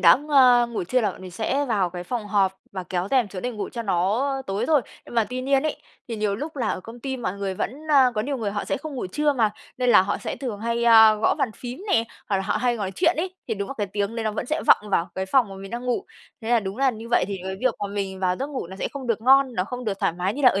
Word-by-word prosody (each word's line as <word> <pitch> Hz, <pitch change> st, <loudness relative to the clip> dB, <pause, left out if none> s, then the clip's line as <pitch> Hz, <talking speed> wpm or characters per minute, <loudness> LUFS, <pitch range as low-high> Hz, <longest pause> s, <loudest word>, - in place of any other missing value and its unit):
đã, 170 Hz, -1 st, +8 dB
nga 260 Hz, -4 st, +5 dB
ngủ 225 Hz, -6 st, -4 dB
trưa 255 Hz, +8 st, +1 dB
là 215 Hz, -, +1 dB
bọn -, -, -13 dB
mình 185 Hz, -, -8 dB
sẽ 260 Hz, +9 st, -1 dB
vào 200 Hz, -8 st, 0 dB
cái 175 Hz, 0 st, -6 dB
phòng 230 Hz, 0 st, -3 dB
họp 195 Hz, -2 st, +1 dB
và 190 Hz, -2 st, -4 dB
kéo 180 Hz, +1 st, -3 dB
rèm 250 Hz, -6 st, +3 dB
xuống 185 Hz, -2 st, -7 dB
để 250 Hz, -, -1 dB
ngủ 215 Hz, -4 st, -5 dB
cho 235 Hz, -, -5 dB
nó, 195 Hz, +2 st, +1 dB
ơ, 270 Hz, -1 st, -2 dB
tối 200 Hz, +5 st, -1 dB
thôi. 300 Hz, -4 st, +4 dB, 0.3 s
Nhưng -, -, -11 dB
mà 230 Hz, -2 st, +3 dB
tuy 255 Hz, 0 st, -3 dB
nhiên 270 Hz, 0 st, +2 dB
ấy, 310 Hz, -, -1 dB, 0.3 s
thì 230 Hz, -, -4 dB
nhiều 210 Hz, -1 st, 0 dB
lúc 300 Hz, +5 st, -6 dB
là 235 Hz, -5 st, -1 dB
ở -, -, -2 dB
công 230 Hz, +5 st, -11 dB
ty 265 Hz, +1 st, -3 dB
mọi 205 Hz, -7 st, -3 dB
người 195 Hz, -1 st, -2 dB
vẫn, 225 Hz, -, -3 dB, 0.2 s
a, 265 Hz, -3 st, +6 dB
có 215 Hz, -, 0 dB
nhiều 275 Hz, +5 st, -2 dB
người 220 Hz, -5 st, -2 dB
họ 205 Hz, 0 st, -3 dB
sẽ -, -, -1 dB
không 290 Hz, +1 st, -7 dB
ngủ 245 Hz, -, -3 dB
trưa 295 Hz, +10 st, +1 dB
mà, 225 Hz, -6 st, +2 dB, 0.3 s
nên 250 Hz, -1 st, +2 dB
là 185 Hz, -, +7 dB
họ 190 Hz, -, -2 dB
sẽ -, -, -5 dB
thường 235 Hz, -7 st, -5 dB
hay, 235 Hz, +1 st, -1 dB
a, 220 Hz, -2 st, +8 dB
gõ 215 Hz, -, +2 dB
bàn 245 Hz, -, +1 dB
phím 250 Hz, +7 st, -7 dB
nè, 225 Hz, -, +3 dB, 0.2 s
hoặc 200 Hz, -, +2 dB
là 190 Hz, -, -1 dB
họ 205 Hz, -, 0 dB
hay 240 Hz, +1 st, +1 dB
nói 195 Hz, -3 st, -3 dB
chuyện 330 Hz, -, +2 dB
ấy, 370 Hz, +3 st, -2 dB
thì 225 Hz, -, 0 dB
đúng 200 Hz, -1 st, -4 dB
là 275 Hz, -, -5 dB
cái 205 Hz, -, 0 dB
tiếng 205 Hz, +3 st, -3 dB
đấy 225 Hz, -, -2 dB
nó 215 Hz, -, +1 dB
vẫn 225 Hz, -, -4 dB
sẽ 310 Hz, +3 st, -1 dB
vọng 210 Hz, -1 st, +4 dB
vào 170 Hz, -1 st, +1 dB
cái 190 Hz, 0 st, -3 dB
phòng 245 Hz, 0 st, +3 dB
mà 195 Hz, -, -9 dB
mình 195 Hz, 0 st, -9 dB
đang 240 Hz, +1 st, -5 dB
ngủ, 250 Hz, +11 st, -1 dB, 0.4 s
thế 225 Hz, -, -3 dB
là 240 Hz, -1 st, +4 dB
đúng 195 Hz, +1 st, -5 dB
là 270 Hz, -1 st, +3 dB
như 225 Hz, 0 st, -9 dB
vậy -, -, +4 dB
thì 200 Hz, -, -3 dB
cái 190 Hz, 0 st, -4 dB
việc 255 Hz, -2 st, +2 dB
mà 205 Hz, -, -2 dB
mình 195 Hz, -2 st, -3 dB
vào 180 Hz, -1 st, +1 dB
giấc 275 Hz, -, -1 dB
ngủ 275 Hz, -10 st, -5 dB
nó 190 Hz, +2 st, -10 dB
sẽ -, -, -2 dB
không 275 Hz, -3 st, -6 dB
được 230 Hz, -2 st, 0 dB
ngon, 265 Hz, 0 st, +5 dB
nó 185 Hz, -3 st, 0 dB
không 250 Hz, +2 st, -6 dB
được 200 Hz, -2 st, -2 dB
thoải -, -, +2 dB
mái 185 Hz, +4 st, -2 dB
như 285 Hz, -, -4 dB
là 255 Hz, -, +9 dB
ở 195 Hz, -, +1 dB
225 Hz, 320 wpm, -24 LUFS, 195-255 Hz, 0.4 s, là